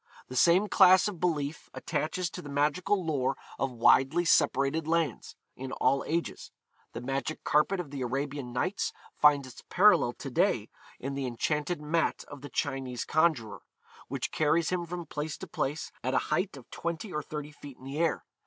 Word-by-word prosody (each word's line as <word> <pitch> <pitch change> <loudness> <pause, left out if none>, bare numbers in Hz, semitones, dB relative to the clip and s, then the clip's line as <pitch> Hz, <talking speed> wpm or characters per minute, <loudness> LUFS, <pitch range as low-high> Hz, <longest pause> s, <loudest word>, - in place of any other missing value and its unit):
The 130 - -7
same 175 +9 +5
class 185 -2 +6
of 200 -5 -5
belief 150 -4 -2
attaches 175 +3 -2
to 180 - -7
the 145 - -9
magical 155 +7 +1
lore 140 -5 0 0.2
of 135 - 0
widely 135 +7 +4
separated 145 0 +2
lands, 165 -5 -1 0.2
in 130 0 -7
all 135 +2 +2
ages. 165 +2 -2 0.4
The - - -5
magic 135 +4 -3
carpet 150 +6 +2
of 160 -6 -5
the 140 -2 -5
Arabian 135 +1 -3
Nights 180 +11 -1 0.2
finds 145 -2 +4
its 130 - -12
parallel - - +5
to - - -8
day - - +1 0.3
in 135 +2 -4
the 135 -1 -2
enchanted 150 +7 -1
mat 165 +2 0
of 145 -2 -10
the 145 - -8
Chinese 135 -3 -2
conjuror, 155 -10 +1 0.5
which - - -3
carries 160 +2 +2
him 175 -2 -1
from 175 0 -5
place 150 0 -4
to - - -7
place, 150 -3 -3
at 130 +2 0
a - - 0
height 180 -1 -1
of 130 - -13
twenty 170 +4 -4
or 150 - -1
thirty 150 0 -6
feet 145 -3 -12
in - - -18
the 135 +3 -5
air. 165 -1 0
150 Hz, 180 wpm, -29 LUFS, 135-170 Hz, 0.5 s, class